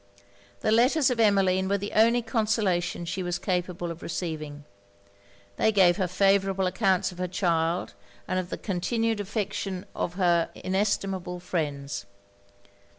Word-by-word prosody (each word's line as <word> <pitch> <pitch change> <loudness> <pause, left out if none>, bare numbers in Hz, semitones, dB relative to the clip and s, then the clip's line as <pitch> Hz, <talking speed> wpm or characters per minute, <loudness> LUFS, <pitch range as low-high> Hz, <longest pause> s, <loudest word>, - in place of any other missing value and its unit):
The - - +1
letters 255 +5 +4
of 240 - -2
Emmeline 190 -3 +3
were 200 - +2
the 205 +1 -5
only 230 +2 +4
consolation 210 -7 0
she 185 +3 -3
was 175 -1 -2
capable 180 -2 -2
of 170 - -9
receiving. 155 -4 -5 0.9
They 220 - +3
gave 190 -4 +5
her 190 -3 0
favourable 195 +1 +2
accounts 190 0 +1
of 180 - -13
her 180 - -1
child, 170 -1 0 0.3
and 185 - 0
of 180 -1 -5
the - - -4
continued 225 +3 -1
affection 195 -2 -3
of 175 - -3
her 175 -3 +2
inestimable 190 -2 -1
friends. 145 - -3
185 Hz, 140 wpm, -27 LUFS, 175-205 Hz, 0.9 s, gave